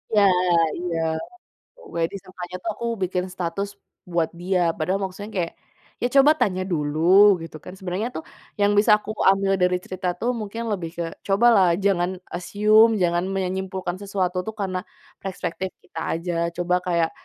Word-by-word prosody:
Ya, 205 - +6 0.6
iya. 175 -2 -2 0.8
Pokoknya 425 - -3
disangkanya 185 -2 -8
tuh 225 - -2
aku 235 - -5 0.2
bikin 180 0 0
status 185 +3 -2 0.4
buat 170 -2 0
dia, 175 0 0
padahal 185 +5 0
maksudnya 200 +3 -5
kayak, 170 -2 -1 0.5
ya 245 - +2
coba 275 +2 +8
tanya 185 -2 +1
dulu, 170 +6 +5
gitu 165 -1 -8
kan. 180 - -9
Sebenernya 190 +4 -3
tuh 160 - -4 0.4
yang 205 0 +4
bisa 210 - +4
aku 215 - -8 0.2
ambil 195 0 +2
dari 180 0 +3
cerita 185 0 -5
tuh, 245 - 0
mungkin 215 +3 -5
lebih 170 -5 -3
ke 170 - -1 0.2
cobalah 200 -1 +5 0.2
jangan 180 -2 +2 0.2
assume, 215 +5 +4
jangan 175 +1 +1
menyimpulkan 190 -1 -2
sesuatu 195 -2 -2
tuh 220 - -4
karena 185 -2 -1 0.4
prespektif 190 -1 -4
kita - - -8
aja, 170 +1 -3 0.2
coba 180 0 0
kayak, 170 -2 +1
185 Hz, 155 wpm, -23 LUFS, 175-200 Hz, 0.8 s, coba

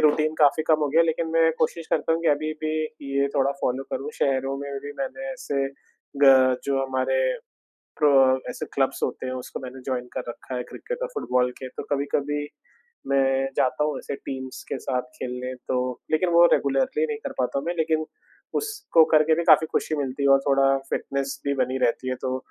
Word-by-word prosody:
Routine 155 +1 +3
काफ़ी 150 +1 +4
कम 155 -1 +5
हो 150 - +1
गया 160 +4 +4
है, 165 - +4
लेकिन 160 +1 0
मैं 165 0 +4
कोशिश 160 +1 -1
करता 165 - +1
हूँ 165 - 0
कि 170 - +3
अभी 155 +2 +1
भी 155 0 0 0.4
ये 140 0 +3
थोड़ा 135 0 +3
फ़ॉलो 130 +2 0
करूँ। 145 +2 -3
शहरों 135 0 +1
में 140 0 -6
भी 145 - -5
मैंने 270 0 -4
ऐसे 140 - -2 0.6
ग 130 -1 +6
जो 135 -1 0
हमारे 130 - -1 0.8
क्रो 150 -1 +4 0.4
ऐसे - - -5
क्लब्स 135 -1 0
होते - - -2
हैं, 130 - -3
उसको 125 -1 -6
मैंने 130 0 -8
जॉइन 125 -2 -2
कर - - -2
रखा 125 +2 -7
है, 125 - -2
क्रिकेट - - -6
और - - -1
फुटबॉल 125 - +1
के। 130 - -6
तो - - -7
कभी-कभी 145 +1 -1 0.6
मैं 135 -1 +2
जाता 130 +3 +2
हूँ 150 -3 -1
ऐसे 140 - -5
टीम्स 130 -1 -7
के - - -2
साथ 125 -2 -1
खेलने 125 0 -5
तो, 125 0 -3
लेकिन 155 +3 +2
वो 170 0 +8
रेगुलरली 140 +3 +1
नहीं 150 -1 -3
कर - - -3
पाता 130 +2 0
मैं। 175 - -1
लेकिन 160 -1 +1 0.6
उसको 410 - +3
करके 155 +1 +5
भी 170 - 0
काफ़ी 155 +1 +7
खुशी 155 - 0
मिलती 140 -1 -3
है, 140 - +4
और 135 0 +7
थोड़ा 135 0 +4
फिटनेस 140 0 -2
भी 140 - +1
बनी 130 +1 -3
रहती 130 +2 -1
है। 130 - -1
तो 130 0 -1
140 Hz, 200 wpm, -25 LUFS, 130-155 Hz, 0.8 s, वो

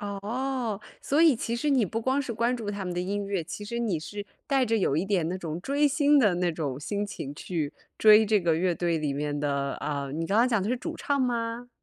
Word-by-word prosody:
哦， 220 +2 -3 0.2
所 295 +4 +2
以 315 -6 +6
其 230 +1 -2
实 295 +5 -1
你 260 -6 +4
不 225 +5 -3
光 260 +4 +1
是 260 -4 -3
关 235 +2 +1
注 215 -3 -4
他 200 -2 -4
们 180 - -3
的 175 - -1
音 200 +2 -2
乐， 195 -4 -2
其 190 +5 -7
实 235 +3 -4
你 205 -9 -1
是 205 +5 -7 0.2
带 270 -2 +2
着 225 0 +2
有 150 -6 +1
一 165 - +1
点 190 -5 0
那 185 - -2
种 165 -2 -5
追 285 +8 +2
星 290 +1 +4
的 210 -8 +4
那 175 0 +1
种 145 -5 -4
心 205 +6 -2
情 145 -7 -6
去 155 -3 -3 0.3
追 215 0 +7
这 210 -1 +3
个 165 -2 +2
乐 180 0 +1
队 170 -1 0
里 150 -2 -1
面 145 +1 -2
的 140 -1 -1
啊， 140 -2 -3
你 160 +4 -3
刚 200 +5 +2
刚 240 +2 +5
讲 225 -6 +1
的 205 - -2
是 250 - +1
主 325 +6 -5
唱 285 -1 0
吗？ 240 -1 -1
205 Hz, 270 characters per minute, -27 LUFS, 165-240 Hz, 0.3 s, 追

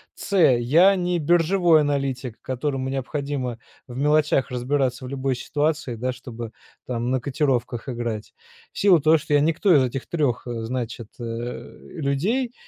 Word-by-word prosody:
с) 200 - -4
я 160 +6 +5
не 180 -1 0
биржевой 170 +1 +4
аналитик, 135 -4 -2
которому 130 0 -2
необходимо 135 -2 -3 0.3
в 125 0 -8
мелочах 150 -1 +2
разбираться 130 +1 -1
в - - -6
любой 135 -1 -1
ситуации, 150 0 -1
да, 125 +3 -2
чтобы 120 -3 -8 0.4
там 120 -1 -2
на 130 - +1
котировках 130 -3 -1
играть. 115 -3 -4 0.4
В - - -7
силу 190 -5 +6
того, 155 +3 +5
что 150 0 -4
я 145 - +6
никто 165 +5 +3
из 135 - +5
этих 130 +1 -4
3, 145 -8 0
значит, 120 -1 -4
э, - - -6 0.6
людей, 185 - -1
135 Hz, 145 wpm, -23 LUFS, 125-155 Hz, 0.6 s, силу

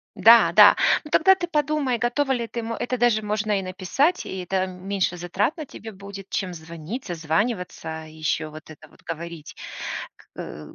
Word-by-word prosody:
Да-да. 210 -3 +7 0.3
Ну, 300 - -12
тогда 385 +3 +6
ты 360 -2 -3
подумай, 300 -5 0
готова 250 +4 0
ли 240 -3 0
ты, 235 +1 -4
м 230 0 -4
Это 250 +2 -2
даже 235 -2 +3
можно 210 -1 0
и - - -3
написать, 195 - 0
и 190 - -5
это 185 +1 -1
меньше 185 0 -2
затрат 190 - -1
на 310 - -5
тебе 225 -4 -10
будет, 200 0 -10
чем 185 -2 -2
звонить, 170 - -7
созваниваться 165 -1 -2
и 155 - -13
ещё 155 0 -1
вот 155 +1 -12
это 155 0 -13
вот - - -23
говорить. 165 -1 -7 0.8
К 75 0 -8
195 Hz, 175 wpm, -24 LUFS, 170-240 Hz, 0.8 s, Да-да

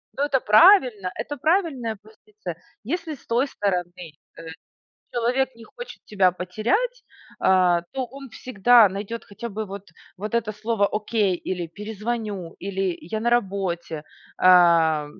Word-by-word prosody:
Ну, 280 - -1
это 275 -3 +2
правильно. 240 - +5
Это 290 - -5
правильная 280 - 0
позиция. 215 -5 -10 0.3
Если 320 - -3
с - - -22
той 240 +4 +1
стороны, 180 -8 -1
э, 175 -3 -9 1.0
человек 250 +2 0
не 230 -1 -14
хочет 485 - -10
тебя 190 -4 +3
потерять, 235 - -2 0.3
а, 180 -2 +3
то 260 -2 -3
он 270 +1 -11
всегда 235 -1 +4
найдёт 200 +4 -6
хотя 235 +4 -7
бы 215 +1 -4
вот 195 0 -8 0.3
вот 210 +4 -5
это 225 -2 0
слово 215 -1 0
"окей", 210 -2 0
или 175 0 -4
"перезвоню", 210 -1 -5
или 195 -2 -2
"я 215 +7 -5
на 235 - 0
работе". 190 -8 -1 0.4
А 170 -4 +5
215 Hz, 140 wpm, -23 LUFS, 185-245 Hz, 1.0 s, правильно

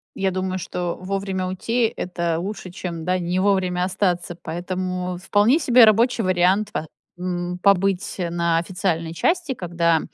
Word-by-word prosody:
Я 195 0 0
думаю, 185 0 -2
что 175 -1 -3
вовремя 190 0 -2
уйти- 225 +5 0
это 170 -2 -2
лучше, 195 0 -5
чем, 170 -2 -6
да, 185 +1 +1
не 175 +1 -1
вовремя 185 -2 +1
остаться. 180 -2 -1
Поэтому 180 +1 -3
вполне 205 - +3
себе 250 -5 +6
рабочий 230 +2 +4
вариант 185 +3 +2
по 160 - -3 0.3
м, 180 0 -3
побыть, 195 -1 +2
э, 175 -2 -2
на 170 -1 +1
официальной 170 -1 -1
части, 340 - 0
когда 170 -6 +1
185 Hz, 150 wpm, -22 LUFS, 175-195 Hz, 0.3 s, себе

